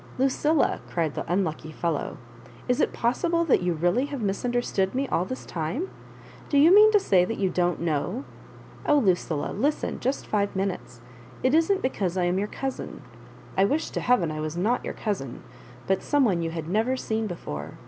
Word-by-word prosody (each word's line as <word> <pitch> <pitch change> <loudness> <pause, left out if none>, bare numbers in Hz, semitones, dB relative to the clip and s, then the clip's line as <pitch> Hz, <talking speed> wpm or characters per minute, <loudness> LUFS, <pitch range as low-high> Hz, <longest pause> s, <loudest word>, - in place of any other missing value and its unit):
"Lucilla," 280 +4 +2
cried 165 -4 -1
the - - -4
unlucky 160 -4 -1
fellow, 165 -1 -2 0.5
"is 250 -1 +2
it - - +2
possible 335 +8 +1
that 285 - +3
you 180 0 +1
really 175 - +1
have 285 -2 -5
misunderstood 210 -1 -1
me 270 +1 0
all 175 - +1
this 255 +7 -6
time? 175 - -3 0.6
Do 285 - +2
you 315 +6 +7
mean 425 +2 +8
to 415 - +6
say 185 - +3
tliat 225 +5 -3
you 190 -2 0
don't 175 -1 +1
know? 170 - -2 0.6
Oh, 295 - +5
Lucilla, 180 - +1
listen 295 +3 -1
just 265 +3 -1
five 205 -2 -1
minutes. 185 -11 -3 0.4
It 255 - +3
isn't 330 +5 +3
because 190 -8 -1
I 180 - +2
am 175 +2 +1
your 205 - -1
cousin. 270 +4 -5 0.5
I 190 - +4
wish 295 +10 0
to - - -3
heaven 240 -11 +2
I 155 0 -4
was 155 +2 -4
not 220 +8 +1
your - - -5
cousin, 160 - -4 0.4
but 190 0 +1
some 290 -2 +2
one 180 -7 +1
you 165 - -1
had 165 -1 -5
never 225 +8 +1
seen 220 -2 -2
before. 75 - -6
200 Hz, 190 wpm, -26 LUFS, 175-265 Hz, 0.6 s, mean